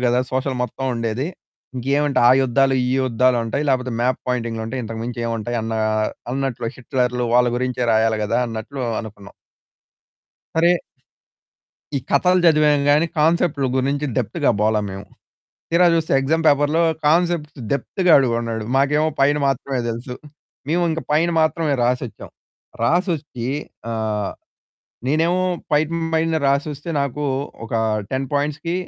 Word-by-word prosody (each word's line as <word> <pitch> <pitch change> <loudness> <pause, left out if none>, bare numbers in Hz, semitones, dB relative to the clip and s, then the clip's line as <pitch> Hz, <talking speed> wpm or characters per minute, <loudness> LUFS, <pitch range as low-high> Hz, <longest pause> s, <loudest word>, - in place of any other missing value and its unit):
గదా! 120 +1 +2
సోషల్ 130 0 -1
మొత్తముండేది. 125 0 -2 0.5
ఇంకేమంటాయి 140 0 +2
ఆ - - +7
యుద్ధాలు, 135 +1 +2
ఈ 125 - 0
యుద్ధాలుంటాయి. 125 +2 +1
లేకపోతే 130 -2 0
మాప్ 125 +1 +1
పాయింటింగ్లుంటాయి. 115 0 -2
ఇంతకు 110 0 -6
మించి 120 0 -5
ఏముంటాయన్న, 115 0 -2 0.6
అన్నట్లు 130 -3 -2
హిట్లర్లు 125 -1 -1
వాళ్ళ 125 0 +5
గురించే 125 0 -2
రాయాలి 110 0 +2
గదా! 105 - 0
అన్నట్లు 115 +5 -6 0.2
అనుకున్నాం. 105 -3 -11 1.2
సరే 170 +1 +4 1.2
ఈ - - +2
కథలు 180 +6 +3
చదివాం 150 -2 +4
గాని 150 +3 +4
కాన్సెప్ట్లు 155 -2 +2
గురించి 140 +3 0
డెప్త్‌గా 140 - +1
పోలా 110 0 +2
మేము. 95 +1 -7 0.7
తీరా 170 +2 +4
చూస్తే 165 -1 0
ఎక్సామ్ 160 +5 0
పేపర్‌లో 145 +3 +3 0.3
కాన్సెప్ట్ 165 -1 +1 0.2
డెప్త్ 140 +7 -2
అడిగున్నాడు. 115 -4 +1
మాకేమో 150 +3 +3
పైన 145 +2 +4
మాత్రమే 135 0 -1
తెలుసు, 120 +2 -5 0.5
మేమింక 165 0 0
పైన 160 +3 +3
మాత్రమే 155 -2 +1
రాసొచ్చాం. 125 -2 -2 0.5
రాసొచ్చి 155 -5 0 0.4
ఆహ్, 110 -3 -2 0.8
నేనేమో 165 +6 +2 0.3
పైన 150 +1 +3 0.3
పైన 160 0 +1
రాసొస్తే 145 +2 -1
నాకు 140 +1 -2 0.4
ఒక - - -12 0.4
10 135 0 -1
పాయింట్స్‌కి, 150 +3 -1
135 Hz, 120 wpm, -21 LUFS, 120-150 Hz, 1.2 s, ఆ